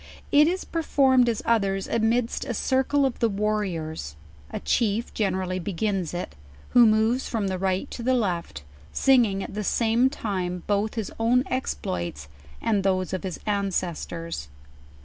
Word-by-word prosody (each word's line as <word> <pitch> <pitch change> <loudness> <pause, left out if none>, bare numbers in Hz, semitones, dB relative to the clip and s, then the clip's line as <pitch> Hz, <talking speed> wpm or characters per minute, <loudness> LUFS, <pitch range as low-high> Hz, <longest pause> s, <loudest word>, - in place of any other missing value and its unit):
It 295 +1 +6
is 370 +2 -1
performed, 265 -6 +3
as 225 - -2
others, 195 -4 +1
amidst 230 +1 +1
a 240 - -3
circle 265 +4 +2
of 265 - -2
the 230 - +3
warriors; 190 - -2 0.3
a - - -4
chief 225 0 0
generally 185 -3 -1
begins 190 -1 -2
it, 175 - -4 0.4
who 240 -2 +7
moves 220 +4 +2
from 215 -4 -1
the 185 -1 -2
ri.(U 190 +4 0
to - - -6
the 255 +2 +2
left, 175 - -2 0.3
singing 235 -8 +3
at - - -7
the 210 +1 -3
same 230 +5 +2
time 185 -8 -3
both 205 +2 0
his 220 -3 -3
own 240 +3 +3
exploits, 85 - -3 0.4
and 210 -3 +2
those 185 -1 0
of 185 - -2
his 185 -3 -4
aricdfctors. 175 - -2
210 Hz, 150 wpm, -25 LUFS, 185-240 Hz, 0.4 s, who